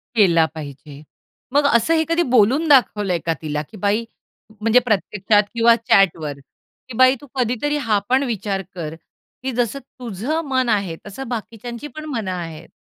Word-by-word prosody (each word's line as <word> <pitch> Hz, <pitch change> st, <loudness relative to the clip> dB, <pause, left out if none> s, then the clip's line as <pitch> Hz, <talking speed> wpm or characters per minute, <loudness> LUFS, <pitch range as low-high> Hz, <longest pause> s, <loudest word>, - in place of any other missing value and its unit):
केला 170 Hz, -7 st, +5 dB
पाहिजे. 145 Hz, -1 st, -9 dB, 0.5 s
मग 290 Hz, 0 st, +4 dB
असं 235 Hz, +8 st, +3 dB
हे 320 Hz, 0 st, +3 dB
कधी 335 Hz, +1 st, +2 dB
बोलून 260 Hz, +9 st, +4 dB
दाखवलंय 210 Hz, -, +3 dB
का 165 Hz, -, +1 dB
तिला? 150 Hz, -1 st, -2 dB
की 185 Hz, +8 st, -12 dB
बाई, 210 Hz, +4 st, 0 dB, 0.6 s
म्हणजे 225 Hz, +3 st, +5 dB
प्रत्यक्षात 210 Hz, +1 st, +2 dB
किंवा 235 Hz, 0 st, +5 dB
चॅटवर 190 Hz, -9 st, +2 dB, 0.6 s
की 255 Hz, -, -7 dB
"बाई 255 Hz, +1 st, +6 dB
तू 290 Hz, -, -13 dB
कधीतरी 255 Hz, +4 st, 0 dB
हा 210 Hz, -2 st, +3 dB
पण 265 Hz, +2 st, +3 dB
विचार 195 Hz, -2 st, -2 dB
कर. 160 Hz, -2 st, -5 dB, 0.5 s
की 265 Hz, -, -1 dB
जसं 245 Hz, +2 st, -1 dB, 0.2 s
तुझं 245 Hz, -, -3 dB
मन 260 Hz, -2 st, +1 dB
आहे 195 Hz, -6 st, 0 dB
तसं 265 Hz, +6 st, -7 dB
बाकीच्यांची 235 Hz, +3 st, -6 dB
पण 310 Hz, 0 st, -7 dB
मनं 220 Hz, -8 st, -3 dB
आहेत." 165 Hz, -3 st, -6 dB
220 Hz, 160 wpm, -21 LUFS, 185-255 Hz, 0.6 s, बाई